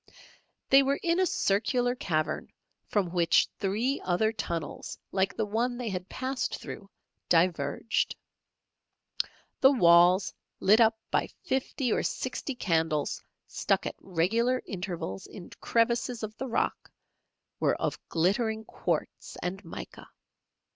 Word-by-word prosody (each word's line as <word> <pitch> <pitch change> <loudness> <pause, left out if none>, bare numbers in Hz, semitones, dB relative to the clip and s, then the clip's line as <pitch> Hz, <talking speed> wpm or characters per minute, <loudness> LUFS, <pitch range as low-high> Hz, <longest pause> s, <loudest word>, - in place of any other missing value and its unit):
They 270 +1 +9
were 275 +1 +1
in 340 +1 +2
a 375 - +3
circular 245 +2 +1
cavern 155 -10 -2 0.4
from 195 -5 0
which 175 -2 +4
three 220 +8 0
other 205 +5 +1
tunnels 165 -7 -4
like 195 +1 0
the 220 - +1
one 235 +4 -1
they 245 -2 -3
had 185 -1 -5
passed 260 -1 -2
through, 195 - -8 0.4
diverged. 165 +2 +1 1.4
The 265 - +7
walls, 180 -4 +5 0.3
lit 215 +4 +5
up 225 0 +5
by - - +2 0.2
fifty 265 - 0
or - - +1
sixty 255 +1 -3
candles 160 -8 0 0.2
stuck - - 0
at - - -2
irregular 225 +9 +1
intervals 175 - -5
in 180 - -11
crevices 235 0 +1
of 215 0 -5
the 265 - -4
rock, 235 - -1 0.7
were - - +2
of - - -1
glittering 220 +6 +1
quartz - - -3
and 190 +3 -3
mica. - - -9
210 Hz, 125 wpm, -29 LUFS, 180-245 Hz, 1.4 s, They